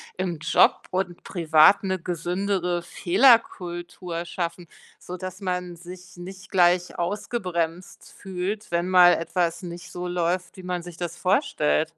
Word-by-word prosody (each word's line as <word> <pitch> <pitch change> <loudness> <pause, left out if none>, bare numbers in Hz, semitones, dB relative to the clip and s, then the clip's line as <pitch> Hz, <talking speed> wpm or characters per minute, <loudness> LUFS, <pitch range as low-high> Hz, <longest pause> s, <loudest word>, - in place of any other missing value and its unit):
im 180 -3 -3
Job 165 - +3
und 185 -2 -3
privat 160 +2 +4
'ne 190 -1 -1
gesündere 180 +1 -2
Fehlerkultur 175 -5 +1
schaffen, 170 0 -4 0.3
sodass 185 +2 -8
man 180 -2 -3
sich 180 +1 -12
nicht 185 +2 -10
gleich 180 -1 +3
ausgebremst 180 -2 -3
fühlt, 195 +2 -5
wenn 170 +1 0
mal 180 -1 +7
etwas 170 +1 -1
nicht 175 -1 -8
so 180 0 -5
läuft, 175 +1 -1
wie 185 - -11
man 180 -1 -3
sich 175 -2 -10
das 175 0 -5
vorstellt? 180 - +1
180 Hz, 130 wpm, -24 LUFS, 170-185 Hz, 0.3 s, mal